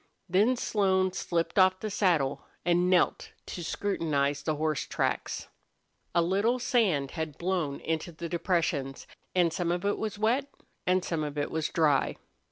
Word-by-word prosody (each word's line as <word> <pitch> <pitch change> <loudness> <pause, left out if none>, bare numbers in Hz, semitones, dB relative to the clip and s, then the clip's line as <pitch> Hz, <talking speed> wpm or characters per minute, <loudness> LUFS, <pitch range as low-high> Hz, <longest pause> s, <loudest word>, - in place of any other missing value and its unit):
Then 210 +8 +3
Slone 190 -5 +1
slipped 170 0 -1
off 185 0 +5
the 215 - -4
saddle 165 -9 +1 0.2
and 175 +1 +3
knelt 185 -2 +2
to 175 - -6
scrutinize 150 -7 0
the 155 +2 -1
horse 155 -1 -1
tracks. - - -2 0.7
A 170 - +5
little 200 +8 +2
sand 205 - +1
had 160 -3 -4
blown 170 -6 -1
into 160 +2 -2
the 170 +1 -6
depressions, 165 -5 -1 0.3
and 175 -3 +3
some 170 0 -1
of 175 +2 -2
it 205 - +1
was 215 -2 -3
wet 245 +7 +1 0.4
and 185 0 +2
some 165 -3 -1
of 150 -1 -5
it 145 - -1
was 160 -1 -1
dry. 150 -5 +2
175 Hz, 160 wpm, -29 LUFS, 155-190 Hz, 0.7 s, off